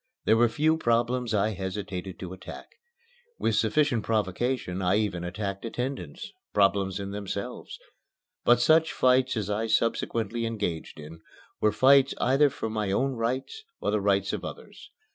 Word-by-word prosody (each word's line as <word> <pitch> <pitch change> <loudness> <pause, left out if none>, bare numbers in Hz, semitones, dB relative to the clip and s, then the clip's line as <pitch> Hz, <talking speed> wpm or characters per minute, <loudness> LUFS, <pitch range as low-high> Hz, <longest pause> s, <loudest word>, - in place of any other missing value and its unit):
There 110 - +5
were 120 +1 +4
few 155 +7 +2
problems 120 -2 +1
I 105 0 +2
hesitated 95 -1 -5
to 90 -1 -7
attack. 95 - -9 0.7
With - - 0
sufficient 145 -8 +2
provocation 110 -2 -1
I 90 +1 +2
even 100 -5 -1
attacked 100 +2 -4
attendants 120 - -5 0.2
problems 100 -1 +2
in 100 0 -5
themselves; 100 -1 -5 0.7
but 120 0 +5
such 160 +6 +4
fights 130 -1 +3
as 105 -3 -2
I 110 +2 -1
subsequently 115 0 0
engaged 100 -10 -4
in 80 +2 -10 0.4
were 105 - +3
fights 135 +4 +5
either 140 +3 +4
for 135 - -5
my 110 -3 -2
own 135 +7 +1
rights 130 - -3 0.2
or - - -1
the - - +1
rights - - +1
of - - -4
others. - - -9
110 Hz, 150 wpm, -27 LUFS, 100-125 Hz, 0.7 s, There